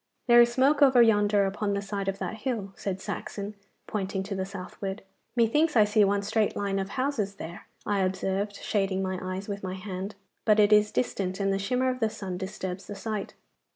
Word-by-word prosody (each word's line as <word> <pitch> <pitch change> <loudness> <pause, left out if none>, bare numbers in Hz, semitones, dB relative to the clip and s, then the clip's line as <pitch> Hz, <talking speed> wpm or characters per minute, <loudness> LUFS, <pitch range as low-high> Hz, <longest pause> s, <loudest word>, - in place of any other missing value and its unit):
'There 240 -1 +8
is 240 0 +5
smoke 275 +4 +3
over 265 -3 +7
yonder, 205 -3 +5
upon 200 +1 -1
the - - 0
side 200 -1 -4
of 195 0 -1
that 220 - -4
hill,' 215 -5 -3
said 190 -2 -3
Saxon, 200 +2 -5 0.3
pointing 195 -2 -2
to 200 +1 -5
the 190 -1 -2
southward. 195 +1 -6 0.3
'Methinks 295 +7 +3
I 220 - +7
see 210 +1 +4
one 200 0 +2
straight 215 +1 +1
line 200 -1 -1
of 190 0 -3
houses 255 -7 -1
there,' 170 -2 -8 0.2
I 205 -1 +1
observed, 190 +2 -1
shading 195 -3 -1
my 185 -1 -2
eyes 185 +1 -4
with 200 -1 -4
my 185 -1 -4
hand. 190 +1 -5 0.3
'But 215 -1 +4
it 210 0 +6
is 210 0 +5
distant, 190 -6 -1
and 195 -1 +1
the 195 - 0
shimmer 250 +5 +1
of 255 - -5
the 225 -2 +2
sun 185 -4 -5
disturbs 190 -1 -5
the 205 - -6
sight. 215 -1 -4
200 Hz, 205 wpm, -28 LUFS, 195-220 Hz, 0.3 s, There